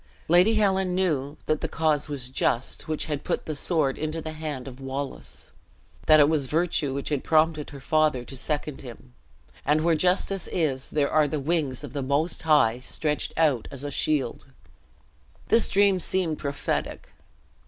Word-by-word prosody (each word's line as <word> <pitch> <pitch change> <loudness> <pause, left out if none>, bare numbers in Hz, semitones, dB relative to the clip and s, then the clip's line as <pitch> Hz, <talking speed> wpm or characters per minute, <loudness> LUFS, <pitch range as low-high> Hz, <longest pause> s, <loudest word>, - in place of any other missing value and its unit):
Lady 180 +7 +5
Helen 190 -3 +2
knew 150 -6 0
that 155 - 0
the - - -1
cause 155 -2 0
was 135 -4 -5
just 130 -1 0
which 155 -1 -2
had 150 -2 -3
put - - -2
the 155 - -3
sword 145 -2 0
into 155 +1 -3
the 160 0 -5
hand 155 -5 -5
of 130 0 -9
Wallace; 135 +1 -5 0.6
that 155 -1 +7
it 145 - +7
was 150 -3 +1
virtue 160 -2 0
which 140 - -3
had 145 -3 -1
prompted 155 -1 +2
her 140 - -10
father 155 -4 +1
to 135 - -8
second 145 +1 -3
him; 125 -1 -12 0.5
and 150 +2 +2
where 170 0 +3
justice 185 +3 +1
is 140 -7 -1
there 145 -2 0
are 155 -1 +4
the 150 +1 -2
wings 145 -3 -1
of - - -8
the 145 - -2
Most 140 +5 0
High 145 -7 +3
stretched 150 +3 -2
out 145 -8 +2
as 140 0 -7
a 145 - -4
shield! 140 -3 -1 1.0
This 230 - +5
dream 200 -1 +3
seemed 175 -3 0
prophetic. 140 -1 -3
150 Hz, 175 wpm, -26 LUFS, 140-160 Hz, 1.0 s, that